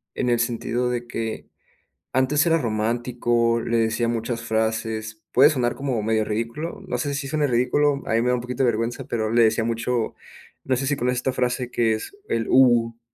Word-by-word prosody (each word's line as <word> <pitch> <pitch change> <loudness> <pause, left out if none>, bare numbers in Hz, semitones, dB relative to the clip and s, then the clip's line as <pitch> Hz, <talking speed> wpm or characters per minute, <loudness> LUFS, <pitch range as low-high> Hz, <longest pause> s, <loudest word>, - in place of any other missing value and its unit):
En 125 - 0
el 120 -1 +2
sentido 120 +1 -1
de 120 -1 -3
que 115 -1 -4 0.7
antes 130 +4 +2
era 165 0 +4
romántico, 115 0 0
le 115 0 0
decía 115 +1 +1
muchas 115 0 -2
frases 110 -1 -2
puede 135 +4 +7
sonar 125 -5 0
como 130 -5 -2
medio 110 0 +1
ridículo, 115 +10 -4
no 125 - -2
sé, 140 +3 -2
si 140 0 -3
suene 150 0 0
ridículo. 140 +3 +2
A - - -2
mí 115 - +3
me 125 - 0
da 125 - +3
un 125 - -1
poquito 125 +1 -3
de 120 - +4
vergüenza, 115 +4 -3
pero, 110 -2 -2
le 120 0 +5
decía 110 0 +2
mucho, 115 0 -1 0.5
no 130 -1 +1
sé, 135 - -2
si 145 - +2
conoces 125 -1 0
esta 130 +1 -1
frase 125 0 -1
que 115 -2 +2
es 110 - -7
el 115 -1 -1
uwu. 120 -3 +4
120 Hz, 200 wpm, -23 LUFS, 115-125 Hz, 0.7 s, puede